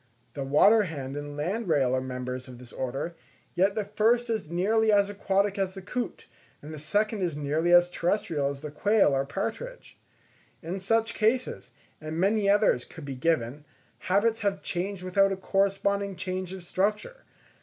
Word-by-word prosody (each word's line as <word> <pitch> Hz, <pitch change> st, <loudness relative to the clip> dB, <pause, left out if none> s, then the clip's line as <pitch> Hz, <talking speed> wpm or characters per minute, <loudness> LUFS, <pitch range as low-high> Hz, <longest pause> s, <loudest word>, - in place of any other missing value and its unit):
The 140 Hz, -, -4 dB
water 175 Hz, +11 st, +5 dB
hen 140 Hz, -5 st, -6 dB
and 145 Hz, 0 st, -6 dB
landrail 155 Hz, -, +1 dB
are 130 Hz, -, 0 dB
members 125 Hz, 0 st, -5 dB
of 125 Hz, -1 st, -10 dB
this 125 Hz, 0 st, -13 dB
order, 135 Hz, +6 st, -3 dB, 0.4 s
yet 195 Hz, +3 st, +2 dB
the 215 Hz, -, -1 dB
first 225 Hz, +4 st, +2 dB
is 215 Hz, -9 st, -2 dB
nearly 215 Hz, +6 st, +2 dB
as 200 Hz, -1 st, +3 dB
aquatic 200 Hz, 0 st, 0 dB
as 190 Hz, 0 st, -1 dB
the 195 Hz, -, -7 dB
coot, 245 Hz, +6 st, -4 dB, 0.3 s
and 150 Hz, +2 st, -9 dB
the 155 Hz, -, -7 dB
second 210 Hz, +7 st, 0 dB
is 170 Hz, -5 st, -1 dB
nearly 150 Hz, +4 st, 0 dB
as 175 Hz, 0 st, +7 dB
terrestrial 170 Hz, -5 st, -1 dB
as 140 Hz, -1 st, -6 dB
the 150 Hz, -1 st, -6 dB
quail 200 Hz, 0 st, +3 dB
or 135 Hz, 0 st, 0 dB
partridge. 225 Hz, -, -5 dB, 0.6 s
In 175 Hz, +4 st, -4 dB
such 225 Hz, +4 st, +1 dB
cases, 235 Hz, +4 st, 0 dB, 0.3 s
and 155 Hz, +1 st, -5 dB
many 200 Hz, +2 st, +2 dB
others 205 Hz, -, +3 dB
could 160 Hz, -4 st, -11 dB
be 140 Hz, -, -5 dB
given, 135 Hz, -1 st, -1 dB, 0.4 s
habits 215 Hz, +4 st, +1 dB
have 200 Hz, -1 st, -1 dB
changed 190 Hz, +1 st, -3 dB
without 195 Hz, +2 st, +3 dB
a 195 Hz, -, -2 dB
corresponding 200 Hz, +1 st, 0 dB
change 185 Hz, 0 st, -4 dB
of 190 Hz, -2 st, -8 dB
structure. 210 Hz, -, -1 dB
185 Hz, 170 wpm, -27 LUFS, 150-205 Hz, 0.6 s, as